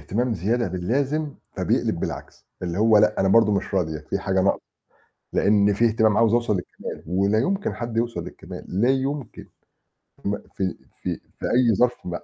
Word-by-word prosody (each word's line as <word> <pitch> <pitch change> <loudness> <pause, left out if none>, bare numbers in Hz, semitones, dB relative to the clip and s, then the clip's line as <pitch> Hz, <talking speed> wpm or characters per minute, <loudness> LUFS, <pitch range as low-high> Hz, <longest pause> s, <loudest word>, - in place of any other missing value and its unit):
هتمام 115 - -1
زيادة 110 +5 0
باللازم 135 - -1 0.2
فبيقلب - - 0
بالعكس، - - -6 0.2
اللي 90 0 -3
هو 110 0 +5
لأ - - +3
أنا 95 - +3
برضه 105 +1 +5
مش 100 - -2
راضي 80 -5 -1
في 100 - 0
حاجة 95 -1 0
ناقصة، 100 - +2 0.7
لإن 105 0 +4
في 115 +4 +2
اهتمام 110 -2 +3
عاوز 115 -1 +4
أوصل 120 -2 +2
للكمال 90 - -6
ولا 100 +5 +2
يمكن 195 - 0
حد 115 -2 -4
يوصل 115 0 -1
للكمال، - - -9 0.2
لا 120 - +4
يمكن 135 -1 -2 0.8
م 100 +1 0
في 95 -3 -4 0.3
في - - -2 0.2
في - - -4
أي 120 -3 +3
ظرف 125 +4 +3
م 90 - -3
110 Hz, 170 wpm, -24 LUFS, 95-120 Hz, 0.8 s, هو